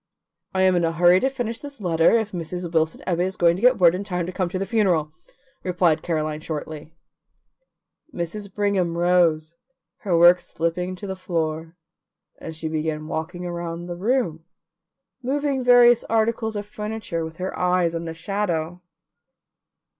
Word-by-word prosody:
"I 190 - +3
am 185 -1 +4
in 175 - +1
a 165 0 +1
hurry 175 +2 +5
to 265 - +1
finish 240 -4 -4
this 280 -3 -8
letter, 170 +2 +3
if 220 -2 -2
Mrs. 175 0 -5
Wilson 160 0 0
Ebbit 175 -2 -1
is 190 - -6
going 170 -1 +4
to 185 - -6
get 250 0 +5
word 175 -4 +5
in 185 +2 -3
time 180 -3 -2
to 180 - -5
come 185 -1 -2
to 185 - -3
the 195 - -2
funeral," 185 -8 +1 0.5
replied 175 -3 +2
Caroline 155 -2 -2
shortly. 155 0 -6 1.2
Mrs. 195 +4 -5
Brigham 190 -4 0
rose, 170 -3 +2 0.4
her 185 -5 0
work 175 +1 +7
slipping 180 +3 -3
to 185 - -9
the 190 -1 -4
floor, 165 -2 -3 0.6
and 160 - -7
she 160 0 -4
began 155 -1 -2
walking 170 +3 -5
around 170 -1 -5
the 175 0 -5
room, 190 -5 -1 0.8
moving 275 +1 -1
various 245 -1 +6
articles 220 0 0
of 205 0 -4
furniture, 210 -5 -4
with 160 0 -8
her 185 +1 -4
eyes 180 -2 +1
on 165 0 -4
the 165 0 -5
shadow. 175 -2 -2
180 Hz, 165 wpm, -23 LUFS, 165-205 Hz, 1.2 s, work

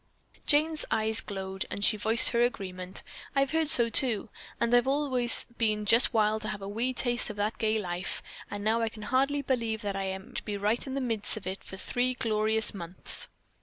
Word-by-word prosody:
Jane's 310 +1 +3
eyes 220 0 +1
glowed, 190 -1 -5
and 200 - -1
she 220 - +4
voiced 220 +2 +5
her 235 - +2
agreement. 185 -6 -2 0.3
"I've 275 -1 +2
heard 320 -1 +1
so, 235 -6 +7
too, 230 -2 +3 0.3
and 235 0 +1
I've 245 +1 +4
always 265 -4 +2
been 215 -2 +1
just 230 +4 +4
wild 215 -1 +2
to 215 - -4
have 210 -2 -5
a - - -5
wee 230 +5 -1
taste 245 -1 0
of 215 - -6
that 205 +2 -2
gay 220 0 +1
life, 180 -2 -4 0.3
and 205 0 -5
now 225 +2 +2
I 225 - 0
can 215 -1 -11
hardly 275 +5 +1
believe 230 -4 -1
that 200 -1 -2
I 195 0 -2
am 190 0 -6
to - - -4
be 205 -1 -4
right 210 +6 +1
in 265 - -4
the 275 - -1
midst 225 -4 -1
of 210 - -8
it 190 +1 -5
for 190 - -10
three 250 +6 -1
glorious 220 -1 0
months." 175 -2 -4
220 Hz, 210 wpm, -29 LUFS, 205-245 Hz, 0.3 s, so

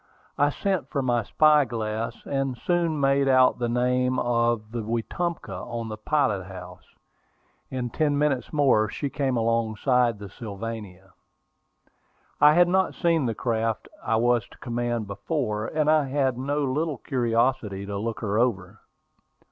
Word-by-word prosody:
I 145 +1 +3
sent 190 +4 -2
for 140 -3 -1
my 120 -2 +1
spy 150 +6 +4
glass, 115 -2 -4
and 135 -2 -2
soon 170 -2 0
made 140 0 +2
out 130 -2 +4
the 120 -1 -1
name 125 +1 +1
of 115 -3 0
the 120 0 -3
Wetumpka 120 +10 -3
on 115 -2 -5
the 110 - -4
pilot 110 -6 0
house. 90 -1 -11 0.7
In 125 -2 -3
ten 145 +1 +1
minutes 145 -4 0
more 130 -8 +3
she 140 +4 -4
came 135 -3 0
alongside 115 +1 +1
the 100 0 -8
Sylvania. 100 -3 -8 1.3
I 150 +1 +7
had 175 0 +6
not 190 +1 +1
seen 165 -6 +1
the 115 - -2
craft 115 -2 -1 0.2
I 115 - +1
was 120 0 +2
to - - -18
command 120 -2 -2
before, 105 +1 -2
and 155 -1 0
I 155 -2 +4
had 135 -2 +1
no 145 +4 -1
little 145 +2 -1
curiosity 120 -5 0
to 100 0 -5
look 115 +1 -4
her 105 0 0
over. 105 -4 -1
120 Hz, 150 wpm, -25 LUFS, 110-140 Hz, 1.3 s, I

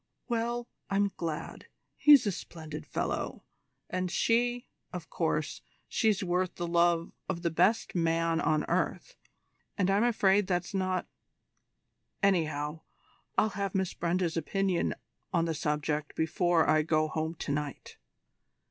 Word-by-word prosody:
"Well, 235 0 -1 0.2
I'm 200 0 +2
glad. 160 -3 -5 0.3
He's 290 -5 +7
a 205 - +2
splendid 155 -3 -8
fellow; - - -3 0.4
and 185 0 -2
she 240 +5 +1 0.3
of - - -7
course, - - -1 0.3
she's 215 -4 +1
worth 180 0 0
the 175 - -3
love 170 0 +2 0.2
of 170 - -3
the 170 - +1
best 185 +8 +2
man 165 -1 +1
on 155 -1 +2
earth - - -1 0.6
and 195 -1 +2
I'm 200 +3 +3
afraid 205 -4 +3
that's 180 +1 -1
not 185 -1 0 1.2
anyhow, 155 -5 +1 0.6
I'll 215 - +4
have 200 -1 -3
Miss 190 -2 0
Brenda's 175 0 0
opinion 190 +2 0 0.4
on 170 -2 +2
the 165 - -1
subject 150 -1 -2
before 165 +1 +2
I 155 0 +4
go 155 0 +2
home 160 +1 -2
to 155 - -4
night." 145 -1 -4
175 Hz, 130 wpm, -30 LUFS, 160-195 Hz, 1.2 s, He's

